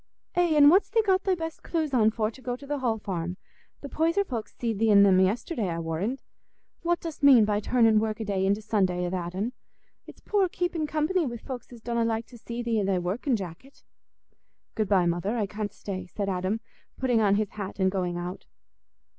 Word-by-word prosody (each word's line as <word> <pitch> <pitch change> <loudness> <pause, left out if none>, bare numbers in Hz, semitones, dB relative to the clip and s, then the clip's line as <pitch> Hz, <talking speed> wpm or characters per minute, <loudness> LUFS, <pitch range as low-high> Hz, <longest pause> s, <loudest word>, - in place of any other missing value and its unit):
"Eh, 350 -3 +2
an' 290 -1 +8
what's 375 +6 +4
thee 450 - +2
got 380 -1 +2
thy 380 -2 +2
best 325 -2 -6
cloose 315 -4 -2
on 220 -4 +5
for 220 0 -1
to 260 - -15
go 245 0 -3
to 280 - -12
th' 290 0 -3
Hall 235 -4 0
Farm? 180 -4 -4 0.4
The 285 - -6
Poyser 330 +7 +1
folks 235 - -5
see'd 225 -4 -2
thee 225 0 +3
in 200 -1 +7
'em 190 -2 +5
yesterday, 205 - 0
I 165 - -3
warrand. 170 +10 -3 0.6
What 345 0 0
dost 330 -3 -7
mean 265 -6 +7
by 210 0 +1
turnin' 225 0 +3
worki'day 215 -3 -1
into 200 +2 +1
Sunday 185 -4 +1
a 175 - -3
that'n? 185 +6 -3 0.5
It's - - -13
poor 395 -3 +1
keepin' 345 -3 -2
company 315 +4 +1
wi' 235 -1 -4
folks 250 +2 -8
as 235 -2 -12
donna 235 0 -1
like 225 0 -1
to 240 - -13
see 235 +2 -5
thee 230 -2 +1
i' - - 0
thy 190 -1 +1
workin' 200 - -1
jacket." 195 +7 -8 0.9
"Good 215 -3 -1
bye, 190 -4 +4
mother, 175 +7 -1
I 215 - +1
can't 205 +1 -4
stay," 185 -3 -6
said 200 +2 -4
Adam, 190 +4 -1 0.4
putting 245 -4 +2
on 200 -2 +4
his 210 -1 -1
hat 200 -2 -6
and 190 0 +3
going 180 -2 -2
out. 175 +1 -6
220 Hz, 210 wpm, -27 LUFS, 195-270 Hz, 0.9 s, an